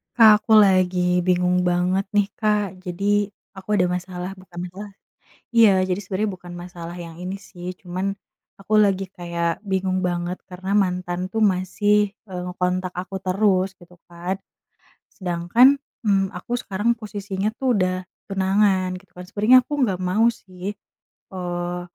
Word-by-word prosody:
Kak, 225 Hz, -3 st, +8 dB
aku 225 Hz, -, -3 dB
lagi 185 Hz, -3 st, +4 dB
bingung 180 Hz, 0 st, +2 dB
banget 180 Hz, +2 st, +1 dB
nih, 205 Hz, -1 st, +4 dB
Kak. 210 Hz, -3 st, 0 dB
Jadi 200 Hz, +3 st, 0 dB, 0.3 s
aku 190 Hz, +2 st, -1 dB
ada 180 Hz, -3 st, +3 dB
masalah 180 Hz, +1 st, -4 dB
bukan 185 Hz, -2 st, -11 dB
masalah 200 Hz, +3 st, -9 dB, 0.6 s
iya 215 Hz, -5 st, +6 dB
jadi 185 Hz, -, +1 dB
sebenernya 195 Hz, +1 st, -2 dB
bukan 175 Hz, -1 st, -12 dB
masalah 175 Hz, -1 st, -8 dB
yang 165 Hz, -1 st, -8 dB
ini 185 Hz, +2 st, -5 dB
sih, 180 Hz, -2 st, -8 dB
cuman 185 Hz, +2 st, -3 dB, 0.5 s
aku 200 Hz, +2 st, -1 dB
lagi 195 Hz, -2 st, +3 dB
kayak 170 Hz, 0 st, -3 dB
bingung 190 Hz, -1 st, 0 dB
banget, 175 Hz, 0 st, -1 dB
karena 190 Hz, +2 st, -3 dB
mantan 180 Hz, -2 st, 0 dB
tuh 225 Hz, -, -1 dB
masih, 205 Hz, +1 st, +2 dB, 0.2 s
eee, 180 Hz, -2 st, -5 dB
ngekontak 180 Hz, 0 st, -1 dB
aku 185 Hz, +2 st, -5 dB
terus 190 Hz, 0 st, +2 dB
gitu 180 Hz, 0 st, -17 dB, 0.2 s
kan. 175 Hz, +2 st, -3 dB, 0.8 s
Sedangkan, 195 Hz, +10 st, +3 dB, 0.2 s
mmm, 195 Hz, -2 st, +3 dB
aku 210 Hz, +6 st, -6 dB
sekarang 205 Hz, +4 st, 0 dB
posisinya 205 Hz, -2 st, -3 dB
tuh 260 Hz, -3 st, +2 dB
udah 185 Hz, -1 st, 0 dB, 0.2 s
tunangan 190 Hz, -1 st, +2 dB
gitu 185 Hz, +1 st, -13 dB
kan. 180 Hz, -, -8 dB
Sebenernya 215 Hz, +7 st, +5 dB
aku 295 Hz, -, -6 dB
nggak 190 Hz, -7 st, 0 dB
mau 185 Hz, +5 st, +2 dB
sih, 190 Hz, -3 st, -6 dB, 0.6 s
eee, 175 Hz, -1 st, -3 dB
185 Hz, 145 wpm, -23 LUFS, 180-205 Hz, 0.8 s, Kak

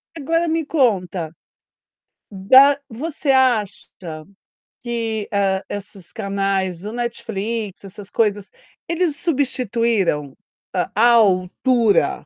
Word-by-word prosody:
Agora, 330 Hz, +3 st, 0 dB
me 325 Hz, 0 st, 0 dB
conta, 190 Hz, -, 0 dB, 1.0 s
da 260 Hz, +9 st, +5 dB
você 290 Hz, +5 st, -5 dB
acha 245 Hz, -7 st, +1 dB, 0.9 s
que, 225 Hz, -3 st, -3 dB
hã, 195 Hz, -1 st, +1 dB
esses 200 Hz, -2 st, -8 dB
canais, 195 Hz, -4 st, -2 dB
o 210 Hz, -, -5 dB
Netflix, 225 Hz, -3 st, -4 dB
essas 195 Hz, +1 st, -10 dB
coisas, 205 Hz, -3 st, 0 dB, 0.4 s
eles 335 Hz, -2 st, 0 dB
substituíram 235 Hz, -, 0 dB, 0.4 s
à 210 Hz, +6 st, +3 dB
altura 215 Hz, +2 st, +2 dB
220 Hz, 90 wpm, -20 LUFS, 195-255 Hz, 1.0 s, da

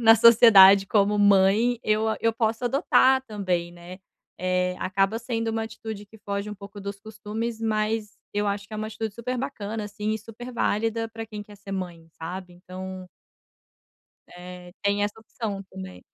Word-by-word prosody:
na 225 Hz, -1 st, +8 dB
sociedade 205 Hz, -4 st, +8 dB
como 205 Hz, 0 st, +2 dB
mãe, 205 Hz, +4 st, +4 dB
eu 215 Hz, +1 st, +1 dB, 0.2 s
eu 230 Hz, 0 st, +3 dB
posso 225 Hz, +1 st, -1 dB
adotar 265 Hz, 0 st, +4 dB
também, 185 Hz, -5 st, -2 dB
né. 175 Hz, +2 st, -11 dB, 0.4 s
Eh, 180 Hz, 0 st, 0 dB
acaba 195 Hz, +3 st, +1 dB
sendo 230 Hz, -1 st, -3 dB
uma 225 Hz, 0 st, -1 dB
atitude 220 Hz, -1 st, -7 dB
que 220 Hz, +2 st, -17 dB
foge 200 Hz, 0 st, -4 dB
um -, -, -5 dB
pouco 200 Hz, +1 st, -11 dB
dos 200 Hz, 0 st, -6 dB
costumes 220 Hz, +2 st, -5 dB
mas 215 Hz, -1 st, -1 dB, 0.2 s
eu 205 Hz, 0 st, 0 dB
acho 200 Hz, 0 st, -2 dB
que 215 Hz, -, -8 dB
é -, -, -4 dB
uma 215 Hz, 0 st, -3 dB
atitude 220 Hz, -1 st, -5 dB
super 250 Hz, +2 st, -3 dB
bacana, 220 Hz, -5 st, -4 dB
assim, 210 Hz, +1 st, -4 dB
e 220 Hz, -, -2 dB
super 230 Hz, +3 st, -10 dB
válida 225 Hz, 0 st, 0 dB
para 225 Hz, 0 st, -7 dB
quem 210 Hz, -1 st, -8 dB
quer 205 Hz, 0 st, -15 dB
ser 200 Hz, 0 st, -9 dB
mãe, 175 Hz, -4 st, -5 dB
sabe, 180 Hz, +2 st, -6 dB
então 185 Hz, +1 st, -8 dB, 1.2 s
É, 180 Hz, 0 st, -11 dB
tem 200 Hz, 0 st, +1 dB
essa 205 Hz, +1 st, -2 dB
opção 215 Hz, -3 st, -5 dB
também. 95 Hz, -1 st, -9 dB
210 Hz, 170 wpm, -25 LUFS, 195-225 Hz, 1.2 s, na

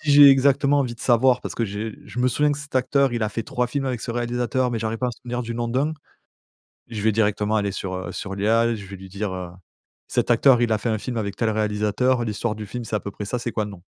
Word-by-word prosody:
Si 155 Hz, -, -1 dB
j'ai 145 Hz, 0 st, +10 dB
exactement 140 Hz, +1 st, +4 dB
envie 125 Hz, -4 st, -1 dB
de 115 Hz, -, -16 dB
savoir 125 Hz, +1 st, +3 dB
parce -, -, -5 dB
que 115 Hz, -, -1 dB
j'ai 105 Hz, +2 st, -4 dB
je -, -, -8 dB
me 125 Hz, -, +3 dB
souviens 150 Hz, +4 st, +2 dB
que 145 Hz, -, -1 dB
cet 150 Hz, -1 st, -11 dB
acteur 135 Hz, +1 st, +2 dB
il 120 Hz, -2 st, -1 dB
a 110 Hz, -, +1 dB
fait 115 Hz, -, -3 dB
3 125 Hz, +3 st, -1 dB
films 135 Hz, +3 st, -2 dB
avec 125 Hz, -3 st, -2 dB
ce -, -, -4 dB
réalisateur 120 Hz, +1 st, -1 dB
mais 115 Hz, -, -2 dB
j'arrive 110 Hz, +1 st, -2 dB
pas 125 Hz, -, 0 dB
à -, -, -1 dB
me 115 Hz, -, -12 dB
souvenir 125 Hz, 0 st, -4 dB
du 115 Hz, 0 st, -5 dB
nom 120 Hz, 0 st, -2 dB
d'1. 135 Hz, +6 st, 0 dB, 1.0 s
Je 115 Hz, -3 st, -5 dB
vais 110 Hz, +2 st, +2 dB
directement 105 Hz, 0 st, +1 dB
aller 100 Hz, -1 st, 0 dB
sur, 95 Hz, -1 st, -4 dB
heu, 95 Hz, -1 st, -5 dB
sur 95 Hz, -, -5 dB
l'IA, 115 Hz, +4 st, +2 dB
je 105 Hz, -3 st, -7 dB
vais 100 Hz, 0 st, -9 dB
lui 95 Hz, 0 st, -11 dB
dire: 95 Hz, -3 st, -5 dB, 0.5 s
«Cet -, -, 0 dB
acteur 120 Hz, +1 st, +5 dB
il 120 Hz, -1 st, +2 dB
a 110 Hz, -, +3 dB
fait 115 Hz, -, -2 dB
un 110 Hz, -, 0 dB
film 120 Hz, +3 st, -5 dB
avec 100 Hz, -3 st, -2 dB
tel 115 Hz, -, 0 dB
réalisateur, 105 Hz, +4 st, +1 dB
l'histoire 105 Hz, +1 st, -2 dB
du 105 Hz, -, -6 dB
film 120 Hz, +4 st, -6 dB
c'est 110 Hz, -, -2 dB
à -, -, -2 dB
peu 100 Hz, -, -6 dB
près 105 Hz, -, -7 dB
ça, 125 Hz, +5 st, -2 dB
c'est 120 Hz, -1 st, -4 dB
quoi 110 Hz, -, -1 dB
le 105 Hz, -, -7 dB
nom?» 95 Hz, -3 st, -12 dB
115 Hz, 285 wpm, -23 LUFS, 105-125 Hz, 1.0 s, j'ai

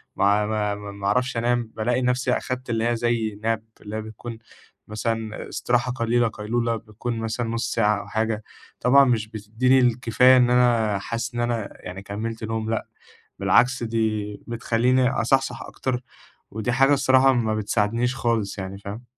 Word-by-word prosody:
ما 100 Hz, +1 st, +3 dB
ما 105 Hz, -1 st, -1 dB
ما 105 Hz, 0 st, -8 dB
ما 100 Hz, 0 st, -5 dB
أعرفش 125 Hz, +4 st, +1 dB
أنام، 120 Hz, -1 st, 0 dB
بالاقي 120 Hz, +3 st, 0 dB
نفسي 125 Hz, 0 st, +1 dB
أخدت 130 Hz, 0 st, -3 dB
اللي 115 Hz, 0 st, 0 dB
هي 120 Hz, -, +1 dB
زي 115 Hz, -3 st, -1 dB
nap 115 Hz, -1 st, +1 dB, 0.2 s
اللي 105 Hz, 0 st, -7 dB
هي 110 Hz, -, -2 dB
بتكون 110 Hz, +2 st, -8 dB, 0.5 s
مثلًا 110 Hz, 0 st, -3 dB
استراحة 125 Hz, +1 st, 0 dB
قليلة، 120 Hz, -1 st, +1 dB
قيلولة، 115 Hz, +2 st, -1 dB
بتكون 115 Hz, +2 st, -5 dB
مثلًا 115 Hz, +1 st, -2 dB
نُصّ 115 Hz, +1 st, -2 dB
ساعة 105 Hz, -2 st, +2 dB
أو -, -, -12 dB
حاجة، 110 Hz, 0 st, -1 dB, 0.4 s
طبعًا 140 Hz, +3 st, +6 dB
مش 115 Hz, -4 st, +1 dB
بتديني 110 Hz, +5 st, +1 dB
الكفاية 125 Hz, +1 st, +4 dB
إن 125 Hz, -1 st, +4 dB
أنا 120 Hz, -4 st, +3 dB
حاسس 115 Hz, +4 st, -4 dB
إن -, -, -2 dB
أنا 120 Hz, -3 st, -1 dB, 0.2 s
يعني 90 Hz, +1 st, -6 dB
كمِّلت 110 Hz, +3 st, -5 dB
نوم، 110 Hz, 0 st, -3 dB
لأ 115 Hz, -, -1 dB, 0.5 s
بالعكس 125 Hz, 0 st, +3 dB
دي 110 Hz, -2 st, -1 dB
بتخليني 125 Hz, +2 st, +2 dB
أصحصح 135 Hz, +1 st, +1 dB
أكتر، 125 Hz, -2 st, -3 dB, 0.5 s
ودي 110 Hz, +4 st, -2 dB
حاجة 135 Hz, +3 st, +4 dB
الصراحة 135 Hz, -1 st, +4 dB
ما 110 Hz, -3 st, 0 dB
بتساعدنيش 115 Hz, +4 st, 0 dB
خالص 115 Hz, -5 st, -1 dB
يعني، 95 Hz, 0 st, -5 dB
فاهم؟ 100 Hz, +4 st, -8 dB
115 Hz, 165 wpm, -24 LUFS, 110-125 Hz, 0.5 s, طبعًا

